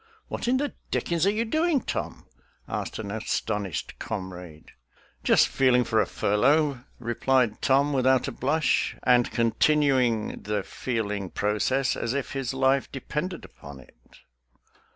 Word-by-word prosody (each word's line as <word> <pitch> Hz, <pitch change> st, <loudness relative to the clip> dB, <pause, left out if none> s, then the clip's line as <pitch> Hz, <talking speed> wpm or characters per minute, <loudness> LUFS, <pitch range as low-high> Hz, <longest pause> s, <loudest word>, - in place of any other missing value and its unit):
"What -, -, -4 dB
in 255 Hz, +2 st, +3 dB
the 285 Hz, +1 st, -2 dB, 0.2 s
dickens 170 Hz, +1 st, 0 dB
are -, -, +4 dB
you 220 Hz, +2 st, -1 dB
doing, 315 Hz, +5 st, +2 dB
Tom?" -, -, -5 dB, 0.4 s
asked -, -, -4 dB
an 105 Hz, -3 st, -5 dB
astonished 105 Hz, -3 st, -3 dB
comrade. 90 Hz, -6 st, -7 dB, 0.3 s
" -, -, -33 dB
Just -, -, +5 dB
feeling 125 Hz, -2 st, +3 dB
for 110 Hz, -1 st, +2 dB
a 100 Hz, -, -1 dB
furlough," 140 Hz, +5 st, +2 dB
replied 120 Hz, -1 st, +1 dB
Tom, 140 Hz, +2 st, +3 dB
without 130 Hz, -1 st, +3 dB
a -, -, -3 dB
blush, 155 Hz, +4 st, 0 dB
and 125 Hz, -1 st, +4 dB
continuing 125 Hz, -1 st, +2 dB
the 105 Hz, -1 st, -2 dB
feeling 105 Hz, -6 st, -3 dB
process 115 Hz, +8 st, 0 dB
as 115 Hz, +3 st, -2 dB
if 140 Hz, -, -3 dB
his 135 Hz, -3 st, -2 dB
life 135 Hz, 0 st, +1 dB
depended 150 Hz, +6 st, -4 dB
upon 70 Hz, -1 st, -12 dB
it. 65 Hz, -, -18 dB
125 Hz, 140 wpm, -26 LUFS, 105-145 Hz, 0.4 s, Just